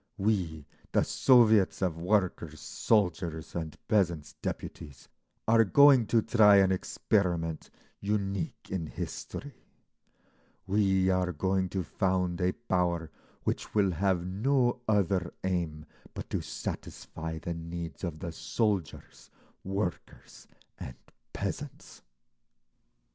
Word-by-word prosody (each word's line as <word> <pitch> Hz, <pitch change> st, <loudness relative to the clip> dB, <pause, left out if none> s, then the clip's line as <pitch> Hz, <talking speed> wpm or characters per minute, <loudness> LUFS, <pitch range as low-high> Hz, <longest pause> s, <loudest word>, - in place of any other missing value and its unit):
We, 90 Hz, -8 st, -1 dB, 0.3 s
the -, -, +4 dB
Soviets 110 Hz, -6 st, +4 dB
of 90 Hz, -4 st, 0 dB
Workers', 85 Hz, -4 st, 0 dB
Soldiers' 85 Hz, -2 st, 0 dB
and 80 Hz, -2 st, -4 dB
Peasants' 85 Hz, -8 st, +1 dB
Deputies, 75 Hz, -4 st, -6 dB, 0.4 s
are 115 Hz, 0 st, +6 dB
going 135 Hz, +2 st, +6 dB
to 115 Hz, -2 st, +3 dB
try 110 Hz, -3 st, +6 dB
an 95 Hz, -1 st, +5 dB
experiment 90 Hz, -3 st, -1 dB, 0.3 s
unique 100 Hz, +7 st, -3 dB
in 90 Hz, -4 st, -2 dB
history; 145 Hz, -, -6 dB, 1.1 s
we 95 Hz, -1 st, +2 dB
are 90 Hz, -1 st, +1 dB
going 95 Hz, +3 st, 0 dB
to 95 Hz, 0 st, -2 dB
found 90 Hz, 0 st, -1 dB
a 90 Hz, +1 st, +2 dB
power 90 Hz, -7 st, -1 dB, 0.3 s
which -, -, -3 dB
will 100 Hz, -3 st, +3 dB
have 90 Hz, +1 st, 0 dB
no 120 Hz, +6 st, +1 dB
other 100 Hz, -4 st, +1 dB
aim 85 Hz, -5 st, -2 dB, 0.3 s
but -, -, -7 dB
to -, -, -1 dB
satisfy 80 Hz, 0 st, -6 dB
the 85 Hz, +2 st, -4 dB
needs 85 Hz, +1 st, -7 dB
of 85 Hz, -4 st, -3 dB
the 85 Hz, +2 st, -5 dB
soldiers, 100 Hz, 0 st, -3 dB, 0.3 s
workers, 95 Hz, -2 st, -5 dB, 0.3 s
and 65 Hz, -, -7 dB, 0.4 s
peasants." -, -, -6 dB
95 Hz, 110 wpm, -29 LUFS, 85-105 Hz, 1.1 s, are